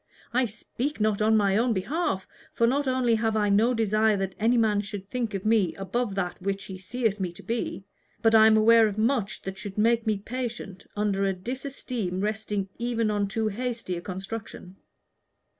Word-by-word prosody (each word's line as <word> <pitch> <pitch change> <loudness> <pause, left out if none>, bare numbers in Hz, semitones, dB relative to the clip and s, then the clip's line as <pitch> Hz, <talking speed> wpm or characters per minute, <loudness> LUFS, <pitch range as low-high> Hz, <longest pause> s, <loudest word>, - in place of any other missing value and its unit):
"I 255 +1 +3
speak 245 +6 -4
not 215 -1 +1
on 220 +1 +4
my 200 -2 +3
own 235 +2 +2
behalf, 195 - -1 0.3
for 235 - +2
not 275 +4 +1
only 255 -2 +2
have 220 0 +1
I 210 -1 +2
no 215 +5 +4
desire 215 -1 +2
that 195 -1 -2
any 230 +3 +3
man 215 -3 +3
should 205 -2 -7
think 235 -4 -2
of 195 - -4
me 215 -6 +3
above 200 +2 -2
that 180 -2 -3
which 195 +1 -2
he 190 -1 -8
seeth 215 +1 -1
me 185 -2 -2
to - - -13
be, 230 -4 -3 0.4
but 225 -1 +3
I 220 0 +8
am 220 0 +5
aware 225 +1 +6
of 205 -1 -4
much 225 -2 0
that 190 0 -6
should 205 -1 -7
make 230 +1 +2
me 215 -2 +2
patient 225 -3 -6
under 205 -1 0
a 195 - +1
disesteem 240 -2 -4
resting 210 -2 -2
even 230 -2 0
on 205 -1 0
too 220 +2 -1
hasty 230 -3 -3
a 170 - -5
construction. 195 0 -7
215 Hz, 190 wpm, -27 LUFS, 195-235 Hz, 0.4 s, I